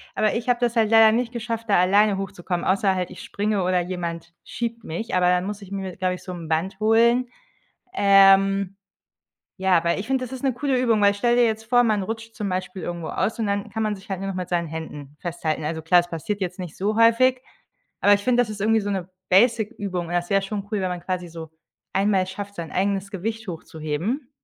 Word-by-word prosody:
Aber 215 - +2
ich 240 +2 -3
habe 245 -1 +2
das 240 -1 0
halt 220 -2 +3
leider 225 -1 +7
nicht 240 +1 0
geschafft, 230 -1 -5
da 200 - +4
alleine 200 +2 +4
hochzukommen, 180 -2 -4
außer 195 0 +2
halt 180 0 -3
ich 185 - -10
springe 205 -1 -1
oder 180 0 +2
jemand 170 -2 -5
schiebt 230 -1 -4
mich, 175 +8 -5
aber 180 -1 +3
dann 180 +1 +2
muss 205 0 -5
ich 195 - -11
mir 190 -2 -5
glaube 185 -1 -1
ich, - - -13
so 185 - -7
'n 170 -3 -7
Band 185 +5 -1
holen. 235 +3 +3 0.6
Ähm, 195 - +5 0.8
ja, 185 -3 +2
weil 170 +3 +1
ich 210 - -7
finde, 265 -1 0
das 250 - -9
ist 260 - -7
'ne 270 - +1
coole 265 +2 -1
Übung, 230 -4 +2
weil 200 0 +4
stell 240 +4 +1
dir 245 - +5
jetzt 220 -1 0
vor, 245 +2 +4
man 215 -3 +1
rutscht 225 +2 -6
zum 210 -3 -3
Beispiel 185 0 -4
irgendwo 170 -2 -5
aus 205 +5 -2
und 225 - -1
dann 200 0 -2
kann 220 -1 -2
man 210 -1 0
sich 195 0 -14
halt 190 - -2
nur 195 - -4
noch - - -5
mit 180 -1 -4
seinen 170 -1 0
Händen 150 -2 -8
festhalten. 165 -3 -3
Also, 160 +1 -3
klar, 175 +2 +5
es 175 - -8
passiert 185 +5 -4
jetzt 180 -1 -3
nicht 175 -4 -7
so 210 +3 -1
häufig, 250 +3 +4 0.6
aber 205 - +5
ich 200 - +2
finde, 245 -1 +3
das 225 - -2
ist 205 -2 -6
irgendwie 220 +1 +3
so 205 - -3
'ne 190 -2 -3 0.2
Basic 225 +3 +4
Übung 180 -4 -3
und 175 - -5
das 175 0 -1
wäre 195 -1 +2
schon 200 0 -4
cool, 210 - 0
wenn 185 - -1
man 180 -1 -4
quasi 180 -1 -3
so 165 -1 -9 0.4
einmal 195 -1 +2
schafft, 200 +1 -7
sein 165 -2 -6
eigenes 195 +1 -1
Gewicht 220 +3 -5
hochzuheben. 165 - -4
195 Hz, 235 wpm, -23 LUFS, 180-225 Hz, 0.8 s, leider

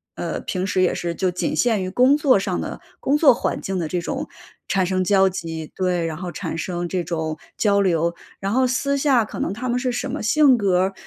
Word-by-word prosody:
呃， - - -3
平 185 0 -3
时 185 - +1
也 180 - +2
是 170 -1 -3
就 185 -1 0
仅 175 - -2
限 225 -5 +2
于 185 - -3
工 255 +7 +4
作 275 -7 +4
上 195 - -2
的 - - -6 0.2
工 285 +2 +1
作 285 -5 +6
环 - - -2
境 190 -1 -3
的 165 - -2
这 175 +2 -2
种 170 - -4 0.4
产 190 -1 +1
生 185 0 0
交 195 0 +4
集， 165 -4 -6
对， 180 -2 0
然 160 -1 -4
后 180 -1 -5
产 - - -5
生 175 0 -3
这 180 0 -2
种 160 -2 -3 0.2
交 200 -2 +3
流。 170 -3 +1 0.3
然 195 +1 -2
后 255 +2 +3
私 280 +3 0
下 270 -5 +3
可 - - -8
能 - - -1
他 250 +4 -4
们 245 +1 +1
是 250 0 -1
什 245 - -3
么 - - -4
性 270 +3 +5
格 190 -4 +2
儿， 190 +1 0
190 Hz, 255 characters per minute, -22 LUFS, 175-245 Hz, 0.4 s, 作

